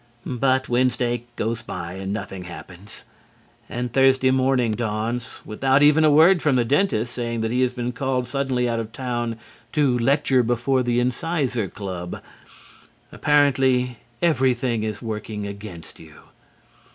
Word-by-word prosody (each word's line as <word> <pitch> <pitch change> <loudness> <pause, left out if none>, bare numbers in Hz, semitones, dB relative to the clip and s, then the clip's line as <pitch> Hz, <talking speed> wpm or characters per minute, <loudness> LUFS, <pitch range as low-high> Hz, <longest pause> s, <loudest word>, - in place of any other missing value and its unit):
But 130 +1 +1
Wednesday 120 -1 0
goes 115 +1 -2
by 85 -6 -6
and 95 +1 -5
nothing 95 -3 -5
happens. 90 +3 -11 0.7
And 120 0 -4
Thursday 130 -1 +4
morning 130 -3 +2
dawns 115 +2 -3
without 135 +6 +2
even 150 +2 +5
a 155 - +6
word 165 +5 +6
from 150 -4 +2
the 120 -2 +2
dentist 125 - +1
saying 115 -2 -3
that 110 0 -1
he 125 +1 +1
has 125 -1 +2
been 125 -1 -3
called 130 -1 -2
suddenly 130 -2 -1
out 115 -1 -1
of 115 -1 -5
town 120 -2 -3 0.4
to 135 -5 +2
lecture 135 +1 +3
before 120 +3 +1
the 120 -1 +1
Incisor 125 - -1
Club. 90 -3 -6 0.9
Apparently, 130 -4 +2 0.3
everything 130 -7 +2
is 110 0 -4
working 105 -2 -5
against 100 -4 -9
you. 80 -2 -14
125 Hz, 140 wpm, -23 LUFS, 110-130 Hz, 0.9 s, a